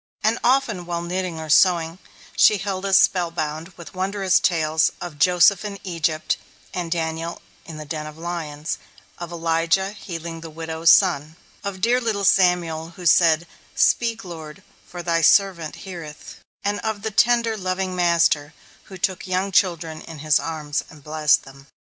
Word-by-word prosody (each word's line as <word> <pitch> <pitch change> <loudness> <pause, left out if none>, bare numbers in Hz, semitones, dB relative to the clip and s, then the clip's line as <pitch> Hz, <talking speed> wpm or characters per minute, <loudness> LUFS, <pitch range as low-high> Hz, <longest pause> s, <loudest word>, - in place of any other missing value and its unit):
And 220 +2 +2
often, 240 -8 +1
while 170 -1 -3
knitting 180 -1 -3
or 160 - -6
sewing, 170 +1 +3 0.4
she 210 - +5
held 195 0 -3
us 195 -1 +5
spell 185 -2 +3
bound 155 -1 -4
with 165 -4 -11
wondrous 190 0 +1
tales 160 -2 +2
of 165 -5 -8
"Joseph 180 +2 +4
in 205 -1 -5
Egypt," 165 -4 -1 0.4
of 175 -2 -3
"Daniel 165 0 -3 0.3
in 160 -2 -9
the 155 - -7
den 155 0 -5
of 155 0 -11
lions," 160 -3 -5 0.4
of 175 -1 -7
"Elijah 165 +3 0
healing 170 -5 -7
the 165 - -8
widow's 160 +1 -1
son," 160 -5 +4 0.3
of 195 -2 -5
dear 245 +4 +3
little 215 -4 -1
Samuel, 170 -3 +2
who 180 - -10
said, 165 0 +4 0.3
"Speak 230 -2 +2
Lord, 160 -3 -9 0.2
for 175 -1 -8
Thy 165 -1 +1
servant 170 -2 +3
heareth," 165 -5 -9 0.3
and 205 +1 -1
of 220 -2 -4
the 220 - -2
tender, 235 +1 +3
loving 185 -1 -3
Master, 170 -4 +2 0.3
who 190 - -10
took 190 +1 -2
young 185 +2 -1
children 170 -4 0
in 165 -1 -10
his 150 0 +2
arms 150 -3 -3
and 150 -3 -15
blessed 150 0 +2
them. 135 0 -15
170 Hz, 160 wpm, -22 LUFS, 160-190 Hz, 0.4 s, she